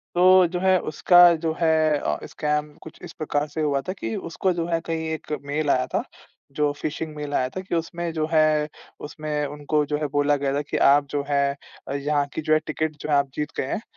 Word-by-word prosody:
तो 180 Hz, -, +3 dB, 0.2 s
जो 180 Hz, +1 st, -3 dB
है 190 Hz, 0 st, +4 dB
उसका 175 Hz, +3 st, +6 dB, 0.2 s
जो 160 Hz, -, +1 dB
है 155 Hz, -2 st, +3 dB
अ, -, -, -2 dB
स्कैम 150 Hz, 0 st, -2 dB
कुछ 160 Hz, -, -12 dB
इस 165 Hz, -, -9 dB
प्रकार 150 Hz, -1 st, -2 dB
से 160 Hz, -, -1 dB
हुआ 140 Hz, -2 st, +1 dB
था -, -, -1 dB
कि 115 Hz, 0 st, -3 dB, 0.2 s
उसको 185 Hz, +1 st, 0 dB
जो 170 Hz, -1 st, -2 dB
है 165 Hz, -1 st, 0 dB
कहीं 160 Hz, -1 st, -3 dB
एक 155 Hz, -, -7 dB
मेल 150 Hz, +1 st, -1 dB
आया 130 Hz, -1 st, +2 dB
था, -, -, +1 dB, 0.5 s
जो 145 Hz, +1 st, +1 dB
फिशिंग 155 Hz, 0 st, -4 dB
मेल 145 Hz, -1 st, -5 dB
आया 130 Hz, -1 st, +1 dB
था 185 Hz, -, -6 dB
कि 185 Hz, -, -4 dB
उसमें 170 Hz, +1 st, -3 dB
जो 155 Hz, -1 st, -1 dB
है 155 Hz, -1 st, +3 dB, 0.4 s
उसमें 150 Hz, -1 st, -3 dB
उनको 150 Hz, +1 st, -1 dB
जो 150 Hz, +1 st, -1 dB
है 150 Hz, 0 st, -2 dB
बोला 145 Hz, 0 st, +3 dB
गया 140 Hz, -1 st, -1 dB
था 145 Hz, -, 0 dB
कि, 145 Hz, -, -4 dB
"आप 140 Hz, +1 st, +5 dB
जो 145 Hz, -1 st, -1 dB
है 140 Hz, 0 st, +1 dB, 0.5 s
यहाँ 145 Hz, -1 st, +2 dB
की -, -, -3 dB
जो 155 Hz, 0 st, +1 dB
है, 155 Hz, -, +5 dB
टिकट 155 Hz, 0 st, -2 dB
जो 155 Hz, -, -5 dB
है 145 Hz, -, +3 dB
आप 140 Hz, -1 st, +2 dB
जीत 150 Hz, 0 st, -3 dB
गए -, -, -1 dB
हैं। -, -, -3 dB
150 Hz, 230 wpm, -24 LUFS, 145-160 Hz, 0.5 s, उसका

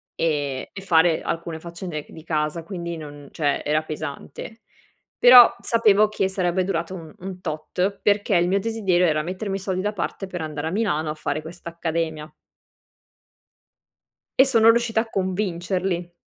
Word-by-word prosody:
e 145 Hz, -5 st, -1 dB
e 195 Hz, -, -8 dB
fare 170 Hz, -3 st, +3 dB
alcune 165 Hz, -1 st, -4 dB
faccende 170 Hz, -2 st, -6 dB
di 160 Hz, -, -12 dB
casa. 155 Hz, 0 st, -2 dB
Quindi 170 Hz, -2 st, -5 dB
non 145 Hz, -2 st, -10 dB
cioè, 145 Hz, -3 st, 0 dB
era 150 Hz, +1 st, +2 dB
pesante. 155 Hz, +8 st, -7 dB, 0.6 s
Però 245 Hz, -1 st, +9 dB
sapevo 215 Hz, -2 st, +4 dB
che 200 Hz, -2 st, -1 dB
sarebbe 185 Hz, -1 st, 0 dB
durato 180 Hz, -1 st, -2 dB
un 165 Hz, -3 st, -10 dB
un 185 Hz, 0 st, -7 dB
tot, 180 Hz, +4 st, -2 dB
perché 205 Hz, -2 st, +2 dB
il 175 Hz, -, +2 dB
mio 195 Hz, +2 st, +2 dB
desiderio 195 Hz, -6 st, +1 dB
era 155 Hz, -2 st, +2 dB
mettermi 190 Hz, +4 st, -4 dB
i -, -, -7 dB
soldi 185 Hz, -1 st, -2 dB
da 205 Hz, +2 st, -1 dB
parte 195 Hz, 0 st, -4 dB
per 180 Hz, -2 st, -6 dB
andare 155 Hz, -1 st, -4 dB
a -, -, -3 dB
Milano 175 Hz, -7 st, 0 dB
a -, -, -1 dB
fare 155 Hz, 0 st, -3 dB
questa 170 Hz, +2 st, -11 dB
accademia. 160 Hz, -2 st, -3 dB, 2.1 s
E 265 Hz, -, +9 dB
sono 230 Hz, -4 st, +5 dB
riuscita 230 Hz, -1 st, +3 dB
a 225 Hz, -, -8 dB
convincerli. 185 Hz, -2 st, -2 dB
175 Hz, 160 wpm, -23 LUFS, 160-195 Hz, 2.1 s, Però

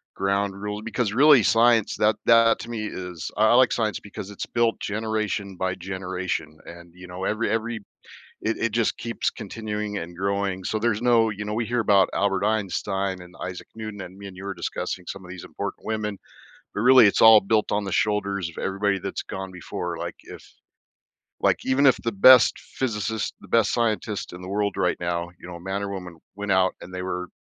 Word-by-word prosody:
ground 100 Hz, +1 st, 0 dB
rule 105 Hz, 0 st, -4 dB
because, 115 Hz, -1 st, -1 dB
really, 140 Hz, +1 st, +7 dB
science, 115 Hz, 0 st, +4 dB
that 105 Hz, 0 st, +3 dB
that 115 Hz, -1 st, +6 dB
to -, -, -8 dB
me 110 Hz, -2 st, -3 dB
is 90 Hz, -4 st, -6 dB
I 110 Hz, +1 st, +4 dB
I -, -, +5 dB
like 130 Hz, 0 st, +5 dB
science 110 Hz, -3 st, -1 dB
because 100 Hz, -1 st, -9 dB
it's 100 Hz, -, -6 dB
built 120 Hz, -1 st, 0 dB
generation 105 Hz, -2 st, -2 dB
by 95 Hz, 0 st, -1 dB
generation, 95 Hz, -4 st, -4 dB
and, 85 Hz, 0 st, -12 dB
you 90 Hz, 0 st, -12 dB
know, 90 Hz, +1 st, -7 dB
every 110 Hz, +2 st, 0 dB
every 115 Hz, +1 st, -1 dB, 0.6 s
it 115 Hz, -, -1 dB
it 115 Hz, -, 0 dB
just 115 Hz, 0 st, 0 dB
keeps 115 Hz, 0 st, -2 dB
continuing 105 Hz, 0 st, -5 dB
and 85 Hz, 0 st, -6 dB
growing, 100 Hz, 0 st, -1 dB
so, 110 Hz, -, -1 dB
there's 110 Hz, -1 st, 0 dB
no 120 Hz, -2 st, +4 dB
you 105 Hz, 0 st, -5 dB
know, 105 Hz, -, -3 dB
we 115 Hz, +1 st, -1 dB
hear 120 Hz, +2 st, -1 dB
about 100 Hz, -3 st, +4 dB
Albert 100 Hz, 0 st, +1 dB
Einstein 100 Hz, -2 st, -1 dB
and 90 Hz, 0 st, -13 dB
Isaac 90 Hz, -1 st, -6 dB
Newton, 110 Hz, -2 st, -7 dB
and 90 Hz, +1 st, -10 dB
me 100 Hz, 0 st, -9 dB
and 95 Hz, -1 st, -11 dB
you 95 Hz, -, -8 dB
were 100 Hz, -, -3 dB
discussing 90 Hz, -1 st, -4 dB
some 100 Hz, -1 st, -7 dB
of 90 Hz, -, -10 dB
these 90 Hz, -1 st, -8 dB
important -, -, -6 dB
women, 105 Hz, -2 st, -2 dB, 0.6 s
but, 105 Hz, -, -2 dB
really, 125 Hz, -1 st, +8 dB
it's 100 Hz, -, +1 dB
all 110 Hz, -1 st, +9 dB
built 105 Hz, +2 st, +1 dB
on 105 Hz, 0 st, +1 dB
the 100 Hz, -, -5 dB
shoulders 100 Hz, -3 st, 0 dB
of -, -, -15 dB
everybody 100 Hz, 0 st, 0 dB
that's -, -, -4 dB
gone 95 Hz, 0 st, -6 dB
before, 90 Hz, -1 st, -5 dB
like -, -, -5 dB
if -, -, -11 dB, 1.0 s
like, -, -, +3 dB
even 130 Hz, +2 st, +3 dB
if 130 Hz, -, +6 dB
the 115 Hz, -, -3 dB
best 120 Hz, +4 st, +7 dB
physicist, 110 Hz, -3 st, -3 dB
the -, -, -13 dB
best 115 Hz, -3 st, +3 dB
scientist 110 Hz, -3 st, -1 dB
in 90 Hz, -, -9 dB
the 90 Hz, -, -8 dB
world 100 Hz, 0 st, -1 dB
right 90 Hz, -, +1 dB
now, 85 Hz, 0 st, -2 dB
you -, -, -12 dB
know, 85 Hz, -1 st, -8 dB
man 95 Hz, +3 st, -3 dB
or 100 Hz, -, -3 dB
woman, 90 Hz, -3 st, -7 dB, 0.2 s
went 105 Hz, 0 st, -3 dB
out 95 Hz, 0 st, +3 dB
and 90 Hz, -, -10 dB
they 90 Hz, -, -4 dB
were 90 Hz, -1 st, -3 dB
100 Hz, 210 wpm, -24 LUFS, 95-110 Hz, 1.0 s, all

